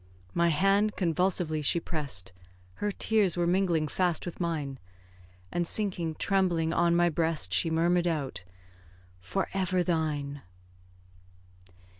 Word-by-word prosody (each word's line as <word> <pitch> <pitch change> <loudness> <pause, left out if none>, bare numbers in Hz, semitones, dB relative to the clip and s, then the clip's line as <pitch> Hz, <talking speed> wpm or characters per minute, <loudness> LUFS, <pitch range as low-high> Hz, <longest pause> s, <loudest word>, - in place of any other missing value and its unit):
My 170 0 +3
hand 195 +6 +2
convulsively 170 -2 +1
she 150 +4 +2
press'd, 140 - -4 0.5
Her 205 - 0
tears 205 -3 +2
were 175 - +1
mingling 175 -3 +1
fast 175 +2 0
with 175 - -7
mine; 150 -6 -3 0.7
And, 175 -1 -1
sinking 180 -7 -1
trembling 175 -4 +1
on 170 0 +3
my 175 0 +4
breast, 160 - 0
She 95 - +2
murmur'd 170 +2 +2
out, 145 - -3 0.8
"For 190 - -2
ever 185 -1 +1
thine!" 150 -5 -2
170 Hz, 120 wpm, -29 LUFS, 155-185 Hz, 0.8 s, my